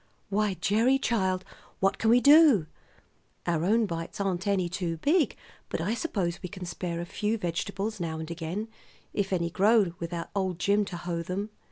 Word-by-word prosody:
"Why, 205 -1 +1
Gerry, 225 +8 +3
child, 190 -7 0 0.3
what 195 +1 +1
can 225 - +2
we 240 +2 +7
do? 285 - +7 0.8
Our 170 -2 0
own 220 +5 +3
bites 165 -2 -5
aren't 195 -1 -1
any 190 -3 +2
too 175 -2 -3
big; 300 - +2 0.3
but - - -2
I 180 +7 0
suppose 195 - -2
we 180 - -5
can 185 -1 -7
spare 175 -1 -4
a - - -4
few 210 +5 -1
vegetables 195 +3 -3
now 165 -2 -3
and 160 +1 -6
again, 170 +6 -4 0.5
if 195 -2 -1
any 170 -2 0
grow 200 -1 +4
without 170 0 -5
old 190 -3 -1
Jim 205 +3 +2
to 180 -3 -6
hoe 170 0 -3
them. 195 +5 -4
190 Hz, 180 wpm, -28 LUFS, 170-215 Hz, 0.8 s, we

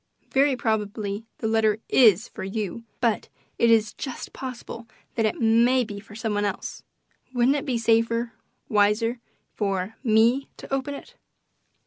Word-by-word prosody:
"Very 275 0 +3
probably 215 -2 -2
the 220 - -2
letter 220 -1 +2
IS 220 -4 +5
for - - -8
you, 210 +3 -4 0.2
but 230 -3 +1 0.3
it 235 - +4
is 220 -2 +4
just 265 -3 -6
possible 240 -2 -7 0.3
that 225 -2 +2
it - - -3
may 235 +3 +4
be 205 -3 -7
for 205 +1 -14
some 220 -1 -2
one 205 0 0
else. 200 -2 -3 0.5
Wouldn't 245 +3 +4
it 290 - -3
be 250 -3 +1
safer 230 +1 +1 0.3
wiser 215 +3 +2 0.3
for 195 0 -2
ME 235 +3 +3
to - - -8
open 275 +1 -1
it?" 480 - -11
225 Hz, 150 wpm, -25 LUFS, 210-245 Hz, 0.5 s, IS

